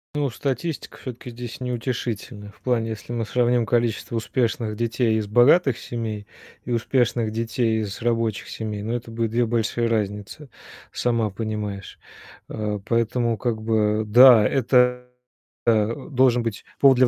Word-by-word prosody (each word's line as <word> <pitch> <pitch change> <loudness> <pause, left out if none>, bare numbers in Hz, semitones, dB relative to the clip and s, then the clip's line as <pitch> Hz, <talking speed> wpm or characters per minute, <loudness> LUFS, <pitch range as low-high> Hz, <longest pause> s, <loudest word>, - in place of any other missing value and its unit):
Ну, 145 -2 0
статистика 140 +5 -4
всё-таки 125 -1 -8
здесь 120 0 -8
неутешительная. 120 -4 -4
В - - -26
плане, 115 -3 0
если 110 +2 -7
мы 115 -1 -2
сравним 120 0 +2
количество 115 -1 0
успешных 115 -1 -1
детей 115 0 0
из 105 -1 -2
богатых 125 - +4
семей 110 -3 -5 0.4
и 125 - -5
успешных 120 -1 +1
детей 115 0 0
из 105 +1 -5
рабочих 115 -3 -1
семей, 105 -2 -5
ну, 115 +2 -2
это 120 -1 -5
будет 115 -1 -2
2 120 +1 +2
большие 115 0 0
разницы, 105 +5 -3 0.4
сама 115 -3 0
понимаешь. 105 -2 -5 0.5
А, 105 -1 -3
поэтому, 115 0 0
как 110 0 -2
бы, 110 -1 +1
да, 120 -1 +8
это, 125 -1 +2 0.6
а, 110 0 +3
должен 125 -3 +3
быть 115 -3 -4 0.2
повод 135 -2 +6
для 130 - +5
115 Hz, 145 wpm, -23 LUFS, 110-125 Hz, 0.6 s, да